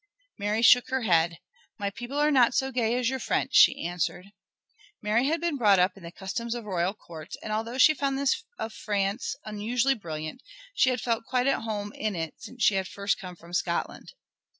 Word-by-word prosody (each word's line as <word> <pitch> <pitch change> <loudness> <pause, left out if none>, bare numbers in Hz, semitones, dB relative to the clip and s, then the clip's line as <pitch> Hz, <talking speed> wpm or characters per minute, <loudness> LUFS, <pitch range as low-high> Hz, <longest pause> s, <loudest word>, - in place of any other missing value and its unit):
Mary 210 +3 0
shook 245 +1 +6
her 265 -1 -1
head. 170 -4 +2 0.4
"My 200 -1 -2
people 240 +6 -6
are 300 +1 +3
not 255 -4 +4
so 265 0 +1
gay 235 -2 +1
as 250 -2 0
your 265 +1 -1
French," - - -1
she - - +6
answered. 175 +2 -3 0.7
Mary 220 +5 +1
had 325 +3 +1
been 340 -4 -1
brought 205 -6 +5
up 185 +1 +2
in 195 - -15
the 170 0 -9
customs 230 +6 -4
of 235 -2 -6
royal 185 0 -1
courts, 165 -4 -10
and 215 - -3
although 225 +3 -3
she 310 +4 +7
found 275 -2 -1
this 275 -1 +1
of 220 0 -5
France 205 +2 -2
unusually 230 +5 0
brilliant 160 - -6 0.3
she 265 - +3
had 250 -3 -1
felt 230 -1 -1
quite 250 -1 +1
at 275 - +2
home 210 -2 -4
in 215 -2 -2
it 165 -2 -4
since 250 -1 -7
she - - +5
had 190 -1 -1
first 200 0 -2
come 180 -2 -8
from 170 +1 -15
Scotland. 170 -1 -2
215 Hz, 205 wpm, -27 LUFS, 190-250 Hz, 0.7 s, she